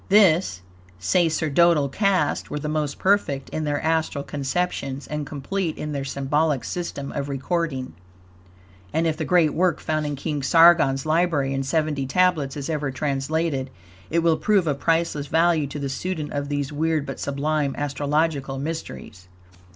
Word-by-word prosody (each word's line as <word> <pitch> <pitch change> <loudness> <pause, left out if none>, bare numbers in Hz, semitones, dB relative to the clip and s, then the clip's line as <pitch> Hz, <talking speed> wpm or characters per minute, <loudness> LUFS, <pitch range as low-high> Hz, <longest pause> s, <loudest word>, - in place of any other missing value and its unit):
This 180 - +4 0.3
sacerdotal 160 - +3
caste 185 0 0
were - - -3
the 150 - -4
most 150 -2 -2
perfect 185 -9 +1
in 155 - -3
their 145 -1 0
astral 160 -3 0
conceptions 140 -1 -2
and 150 -1 -4
complete 160 +5 -3
in 150 - -4
their 140 -2 -3
symbolic 140 0 0
system 145 -5 -4
of 140 0 -4
recording, 140 - -2 1.0
and 165 +8 +1
if 160 -1 +1
the 160 0 -3
great 165 -1 +3
work 175 -2 +1
found 155 -1 -1
in 145 - -2
King 145 +1 -3
Sargon's 165 -2 +5
library 155 -4 +1
in 135 - -1
seventy 150 -1 -1
tablets 155 -3 +1
is 140 - -4
ever 150 -3 -1
translated, 140 +1 -1 0.4
it 165 +1 +1
will 165 -1 +3
prove 205 -2 +2
of 145 -3 -1
priceless 165 -3 0
value 160 -1 +2
to 140 - -7
the 140 -1 -3
student 155 +2 -4
of 145 0 -3
these 145 -1 -2
weird, 155 0 0
but 135 - -6
sublime, 140 0 -1
astrological 145 -1 -1
mysteries. 135 - -6
150 Hz, 155 wpm, -23 LUFS, 140-165 Hz, 1.0 s, Sargon's